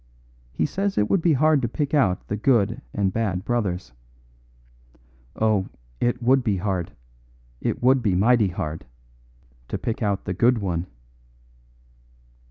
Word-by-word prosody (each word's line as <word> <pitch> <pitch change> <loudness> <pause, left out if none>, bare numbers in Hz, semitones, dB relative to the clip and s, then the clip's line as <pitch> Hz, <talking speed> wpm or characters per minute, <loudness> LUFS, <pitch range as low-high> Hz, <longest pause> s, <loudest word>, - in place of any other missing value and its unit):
He - - 0
says 195 +5 -2
it 105 - +1
would 195 - +3
be 165 -1 +3
hard 155 +1 +3
to 120 - 0
pick 145 +5 -3
out 100 -12 +2
the 105 - -2
good 110 -2 +1
and 95 -2 0
bad 100 -5 -1
brothers. 90 - -2 1.4
Oh, 105 -3 +1 0.3
it 120 0 0
would 130 +2 +4
be 105 -5 0
hard, 95 -3 -2 0.7
it - - -2
would 130 +1 +4
be 100 -6 +1
mighty 110 +2 +4
hard, 80 -4 -5 0.8
to - - -3
pick 115 - -4
out 100 -3 -1
the 90 - -2
good 120 +6 +3
one." 90 -4 -2
110 Hz, 145 wpm, -24 LUFS, 95-125 Hz, 1.4 s, would